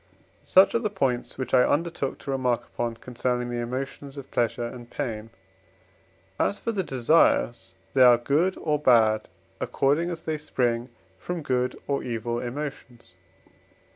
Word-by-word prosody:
Such 190 +1 +5
are 235 - +2
the 220 -2 -1
points 135 -11 -1
which 130 -1 -5
I 130 - +7
undertook 150 0 0
to 140 - -6
remark 125 -3 0
upon 120 -1 -3
concerning 125 0 -2
the 120 - -2
emotions 135 +3 -5
of 135 -1 -9
pleasure 120 0 0
and 120 0 -8
pain; 115 -6 -4 1.1
as 200 - +1
for 230 - -2
the 205 -4 -1
desires, 120 - +2 0.2
they 135 - +3
are 125 -1 +8
good 150 +10 +1
or 150 -2 0
bad 110 -6 +4 0.3
according 150 +6 +1
as 165 -2 -6
they 155 -1 -2
spring 120 -5 -1 0.3
from 175 - -4
good 125 -2 0
or 140 -1 0
evil 120 0 -3
emotions. 125 -2 -7
130 Hz, 150 wpm, -26 LUFS, 120-150 Hz, 1.1 s, are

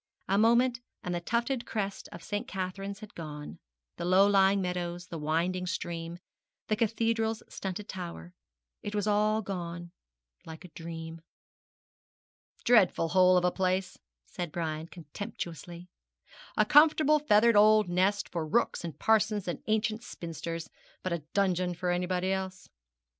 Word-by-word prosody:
A 195 - +2
moment, 235 +2 +4 0.2
and 180 - -3
the 175 - -2
tufted 235 +6 -1
crest 200 -2 -3
of - - -10
St. 205 0 -3
Catherine's 195 +2 -5
had 215 - -10
gone 150 -3 -8 0.4
the - - -4
low 185 +3 +5
lying 195 -1 +4
meadows 180 -1 -3
the 170 -3 -7
winding 170 +4 0
stream 170 -1 -4 0.5
the 215 - +3
cathedral's 225 0 0
stunted 195 +2 -5
tower 170 - -7 0.5
it 205 - -5
was 205 -1 0
all 215 +1 +2
gone, 175 -3 -5 0.5
like 160 +2 -10
a - - -11
dream. 165 0 -8 1.4
'Dreadful 205 -8 +4
hole 185 0 +5
of 180 - +2
a 180 - +3
place,' 185 0 -1 0.3
said 175 -3 -5
Brian, 160 -1 -3
contemptuously; 170 0 -7 0.7
'a - - +5
comfortably 305 0 +6
feathered 215 +2 +5
old 215 0 +6
nest 190 +3 +1
for 170 -2 -3
rooks 165 +7 0
and 165 -3 -6
parsons 215 -2 +2
and 175 - -3
ancient 220 +1 0
spinsters, 165 - -6 0.4
but 185 - -1
a 170 - -1 0.2
dungeon 185 -3 +1
for 180 +1 -1
anybody 180 +1 0
else.' 190 -1 -4
185 Hz, 140 wpm, -30 LUFS, 170-210 Hz, 1.4 s, comfortably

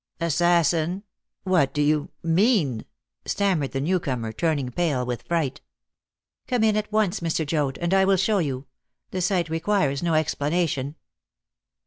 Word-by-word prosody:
"Assassin! 170 +2 +2 0.4
What 175 -8 +2
do 150 - +1
you 150 0 +1
mean?" 165 - +2 0.4
stammered 185 -9 0
the 135 - -2
new 180 +7 +1
comer, 125 -8 -3
turning 145 -2 -1
pale 145 -4 0
with 120 -1 -3
fright. 150 -4 -2 0.9
"Come 250 -3 +1
in 215 -1 +3
at 215 0 -2
once, 215 -2 +1
Mr. 165 -1 -1
Joad, 145 -3 -1
and 170 +2 -1
I 190 0 +5
will 195 0 +3
show 200 +3 +2
you. 135 -5 -2 0.5
The 185 - -2
sight 180 -1 +1
requires 160 -4 0
no 170 -2 +1
explanation." 155 -2 0
165 Hz, 145 wpm, -24 LUFS, 145-185 Hz, 0.9 s, I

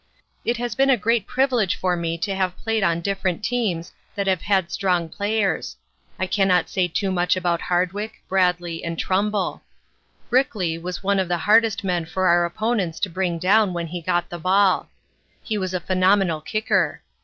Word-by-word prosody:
"It 235 +1 0
has 240 -1 -3
been 270 +5 +2
a 260 - +5
great 225 +1 +1
privilege 250 -7 +1
for 180 -1 0
me 170 -1 -2
to 195 +4 -2
have 185 -2 -1
played 225 -1 -1
on 170 -3 +1
different 190 0 -2
teams 210 -10 -1 0.2
that 200 -1 -1
have 190 -4 +1
had 190 -4 +1
strong 180 -4 0
players. 205 +3 -1 0.4
I 185 - -1
cannot 185 -2 +2
say 185 -3 +1
too 190 +3 -1
much 180 0 +2
about 175 -2 0
Hardwick, 185 +5 -1
Bradlee, 180 -3 0
and 170 -1 -4
Trumbull. 200 +1 -1 0.7
Brickley 205 -10 +1
was 180 +3 -6
one 200 0 +2
of 190 - 0
the 175 0 0
hardest 215 +3 +3
men 175 -3 -1
for 185 +3 0
our 175 0 +4
opponents 195 -2 -1
to 200 - 0
bring 175 -1 -1
down 195 +3 +3
when 170 -1 -3
he 175 +2 -6
got 175 +1 0
the 175 - -7
ball. 190 +2 +2 0.5
He 215 -2 -2
was 185 -1 -2
a 185 - -1
phenomenal 185 -2 +2
kicker. 215 +7 0
185 Hz, 180 wpm, -22 LUFS, 175-205 Hz, 0.7 s, a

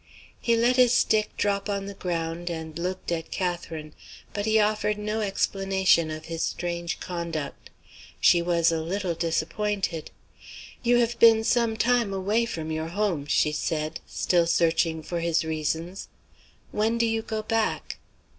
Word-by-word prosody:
He 235 - +2
let 240 +2 +3
his 250 -1 +5
stick 215 -2 +3
drop 200 0 0
on 200 -1 -2
the 200 - -6
ground 170 -2 -3
and 160 -1 -5
looked 180 +1 -3
at 165 -2 -2
Catherine; 170 -4 -4 0.4
but 205 +1 -2
he 220 0 +4
offered 210 0 +1
no 210 +1 -2
explanation 195 -4 +2
of 155 0 -6
his 165 0 -4
strange 170 -1 -2
conduct. 170 -5 -5 0.5
She 175 - +5
was 170 -1 +2
a 165 -1 -1
little 180 +2 -2
disappointed. 170 +2 -1 0.7
"You 240 0 +3
have 235 -1 +1
been 225 -1 +7
some 230 -1 +2
time 235 -3 +2
away 205 +5 +1
from 160 -6 -4
your 160 0 -2
Home," 175 -5 -1
she 150 - +2
said; 155 +1 -2
still 170 -2 +1
searching 165 -1 +2
for 170 +2 -3
his 165 -1 +1
reasons. 160 +4 -3 0.6
"When 220 +2 +1
do 235 - +2
you 225 0 0
go 220 -1 -4
back?" 225 0 -1
180 Hz, 155 wpm, -26 LUFS, 165-215 Hz, 0.7 s, been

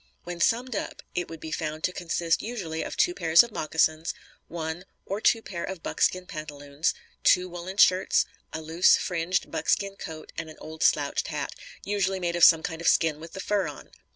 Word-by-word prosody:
When 175 0 -6
summed 240 +6 +1
up, - - -5
it 175 -1 -2
would 165 -1 -8
be 160 +1 -7
found 155 0 -3
to - - +1
consist 170 -1 0
usually 185 -9 -4
of - - -5
two 355 - +3
pairs 165 - +6
of 235 - -8
moccasins, 160 -1 0 0.3
one 165 +1 -4 0.2
(or 200 +2 -3
two 225 0 +3
pair) 170 -3 -5
of 190 -3 -6
buckskin 185 0 0
pantaloons, 145 -2 -3 0.3
two 180 -1 +5
woollen 180 +2 -7
shirts, 185 -2 +5 0.3
a 160 - -5
loose, 165 +3 +5
fringed 180 +1 -1
buckskin 195 -1 0
coat 160 -5 -8
and 160 - -5
an 155 - -12
old 160 0 -9
slouched - - +2
hat - - -4 0.3
(usually 195 -2 0
made 175 -1 -1
of 175 - +1
some 165 -1 +8
kind 160 0 -4
of 170 - -1
skin 160 -2 +3
with 165 +1 -10
the - - -7
fur 200 -2 0
on). 145 - -10
170 Hz, 195 wpm, -27 LUFS, 160-190 Hz, 0.3 s, some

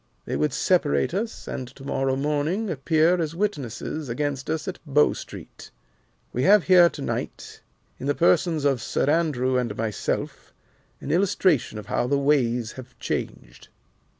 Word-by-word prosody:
They - - -3
would 75 +1 +1
separate 70 - +1
us, 220 +4 -4
and 130 - -5
to 135 - -13
morrow 135 -1 0
morning 150 +9 -1
appear 160 +4 +2
as 160 0 -3
witnesses 150 - -3
against 140 +2 -3
us 160 +3 -2
at 185 - -5
Bow 150 -1 +3
Street. - - -10 0.6
We 125 - -1
have 200 +4 +6
here 180 -2 +6
to - - -9
night, - - -5 0.4
in 135 - -4
the 145 - +1
persons 155 - +2
of 135 -4 +2
Sir 110 - -1
Andrew 140 -5 +1
and 115 -4 -3
myself, 110 -3 -3 0.5
an 140 - -4
illustration 180 - +2
of 105 - -7
how 120 - -1
the 140 +2 +2
ways 125 -5 +1
have 130 -1 -12
changed." - - -5
145 Hz, 155 wpm, -24 LUFS, 125-165 Hz, 0.6 s, have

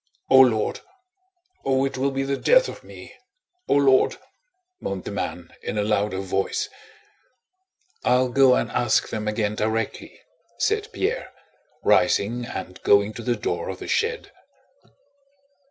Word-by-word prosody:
"O 130 - +8
Lord! 115 -5 +3 0.8
Oh, 135 0 +2
it 135 - -3
will 135 +2 0
be 135 0 -2
the 140 0 -1
death - - +4
of - - -9
me! - - -12 0.5
O - - +3
Lord!" 135 -2 +4 0.6
moaned 95 -2 -4
the - - -6
man 90 -3 -5
in - - -4
a 105 - +1
louder 105 -2 0
voice. 95 0 -2 1.3
"I'll 125 +1 +3
go 130 0 +5
and - - -1
ask 120 -3 +1
them 105 -1 -4
again 105 -1 -1
directly," 110 +1 -3 0.4
said 430 +1 0
Pierre, 470 +6 -2 0.5
rising 120 +4 +2
and 90 - -7
going 100 +1 +3
to 120 - -7
the 120 +1 0
door 85 -5 -3
of 95 - -5
the - - -8
shed. 460 +1 -1
120 Hz, 140 wpm, -24 LUFS, 105-135 Hz, 1.3 s, O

